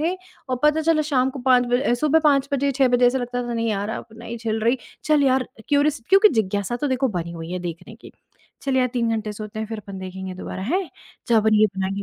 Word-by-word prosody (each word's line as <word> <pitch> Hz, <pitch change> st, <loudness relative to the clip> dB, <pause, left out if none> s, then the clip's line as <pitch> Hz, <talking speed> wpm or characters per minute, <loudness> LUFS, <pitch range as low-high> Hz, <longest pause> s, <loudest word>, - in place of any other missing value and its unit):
थे 335 Hz, +4 st, 0 dB, 0.4 s
और 255 Hz, -, +1 dB
पता 300 Hz, +1 st, +4 dB
चला 315 Hz, -1 st, +3 dB
शाम 265 Hz, -3 st, +1 dB
को 275 Hz, -, -8 dB
5 250 Hz, -1 st, +5 dB
बजे 245 Hz, 0 st, +1 dB
सुबह 305 Hz, +4 st, +3 dB
5 280 Hz, -2 st, +3 dB
बजे, 280 Hz, 0 st, +1 dB
6 265 Hz, 0 st, +3 dB
बजे 245 Hz, 0 st, +4 dB
ऐसा 260 Hz, +2 st, +2 dB
लगता 245 Hz, 0 st, -3 dB
था 235 Hz, -, -2 dB
नहीं 230 Hz, 0 st, -1 dB
यार, 205 Hz, -1 st, -1 dB
अब -, -, -5 dB
नहीं 235 Hz, 0 st, -7 dB
झेल 225 Hz, -1 st, -2 dB
रही, 235 Hz, +4 st, +2 dB, 0.3 s
चल 305 Hz, -2 st, +3 dB
यार 260 Hz, -1 st, +3 dB
अ, 235 Hz, -3 st, -15 dB
क्युरीअस 290 Hz, -1 st, +2 dB
क्योंकि 395 Hz, +2 st, +7 dB
जिज्ञासा 200 Hz, +3 st, -2 dB
तो 290 Hz, +3 st, -2 dB
देखो 260 Hz, 0 st, +1 dB
बनी 170 Hz, 0 st, -5 dB
हुई 165 Hz, 0 st, -7 dB
है 180 Hz, -, -2 dB
देखने 175 Hz, +5 st, -7 dB
की। -, -, -14 dB, 0.5 s
चल 270 Hz, -1 st, 0 dB
यार 255 Hz, -1 st, +3 dB
3 235 Hz, -2 st, 0 dB
घंटे 215 Hz, -1 st, -2 dB
सोते 215 Hz, +1 st, -8 dB
हैं 220 Hz, -, -3 dB
फिर 225 Hz, -1 st, -6 dB
अपन 200 Hz, -2 st, -9 dB
देखेंगे 185 Hz, 0 st, -6 dB
दोबारा, 185 Hz, 0 st, -6 dB
हैं? 350 Hz, -, -1 dB, 0.4 s
चल 230 Hz, -, +4 dB
अपन 215 Hz, 0 st, +3 dB
ये 215 Hz, -, +7 dB
बनाएँगे, 195 Hz, +1 st, -2 dB
245 Hz, 250 wpm, -22 LUFS, 215-275 Hz, 0.5 s, क्योंकि